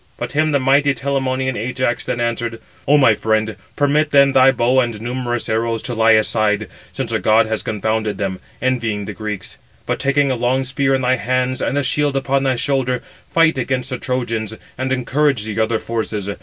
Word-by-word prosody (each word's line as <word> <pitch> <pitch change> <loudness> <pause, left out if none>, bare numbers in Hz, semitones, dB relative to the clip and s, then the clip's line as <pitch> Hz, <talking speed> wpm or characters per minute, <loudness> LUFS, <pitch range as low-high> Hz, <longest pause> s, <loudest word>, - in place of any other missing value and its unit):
But - - -4
him 155 +1 +1
the 145 - +3
mighty 140 +1 +3
Telamonian 130 0 -1
Ajax 125 +1 -1
then 120 - -3
answered: 115 -1 -2 0.3
"O 145 +2 +5
my 130 -6 +5
friend, 110 0 0 0.2
permit 145 +1 +2
then 140 -1 +5
thy 135 0 +6
bow 125 +1 +2
and 120 -4 -1
numerous 120 +1 -3
arrows 115 0 -1
to 125 - -3
lie 115 0 +4
aside, 110 -1 +1 0.2
since - - -4
a - - 0
god 110 +1 +4
has 110 0 -2
confounded 110 -1 -2
them, 95 -2 -3 0.2
envying 115 -5 -1
the - - -6
Greeks; 105 -4 -6 0.3
but, - - -2
taking 140 0 +2
a - - 0
long 125 +2 0
spear 135 +1 +1
in 130 - -2
thy 130 +1 +2
hands, 130 +3 -1
and 140 - -1
a 145 - +1
shield 145 +1 0
upon 135 0 0
thy 135 -1 +1
shoulder, 125 -1 -1 0.3
fight 165 -4 +3
against 130 0 -2
the 125 - -3
Trojans, 115 -5 -2 0.2
and 130 +1 -3
encourage 130 -1 +1
the 110 0 -4
other 110 +1 +1
forces. 110 -3 -3
125 Hz, 195 wpm, -19 LUFS, 110-135 Hz, 0.3 s, thy